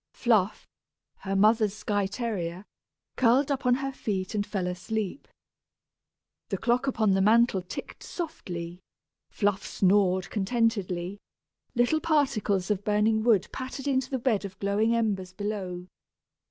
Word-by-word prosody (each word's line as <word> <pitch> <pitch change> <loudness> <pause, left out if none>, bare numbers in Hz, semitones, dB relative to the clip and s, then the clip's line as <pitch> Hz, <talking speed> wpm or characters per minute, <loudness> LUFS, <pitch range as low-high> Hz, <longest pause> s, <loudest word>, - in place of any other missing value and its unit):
Fluff, 215 -5 +1 0.5
her 195 0 -3
mother's 215 +1 +4
Skye 205 -2 -1
terrier, 190 -5 -4 0.5
curled 260 +4 +4
up 270 -2 -1
on 245 - +5
her 270 +1 -3
feet 195 -7 -3
and 205 -1 -1
fell 195 -4 -2
asleep. 190 +6 -3 1.2
The - - -1
clock 250 +3 +1
upon 220 -6 +2
the 190 0 +3
mantel 220 -1 +4
ticked 180 - -8
softly, 175 - -6 0.5
Fluff 205 -2 0
snored 190 -1 +2
contentedly, 200 -4 -1 0.6
little 245 +6 +3
particles 250 - +1
of 205 -1 -1
burning 215 +1 +2
wood 215 -4 +3
pattered 260 +1 -6
into 260 -2 +1
the 265 - -1
bed 230 -5 +1
of 190 -1 -7
glowing 210 +4 +1
embers 195 -5 -1
below. 190 -3 -4
210 Hz, 130 wpm, -27 LUFS, 190-240 Hz, 1.2 s, on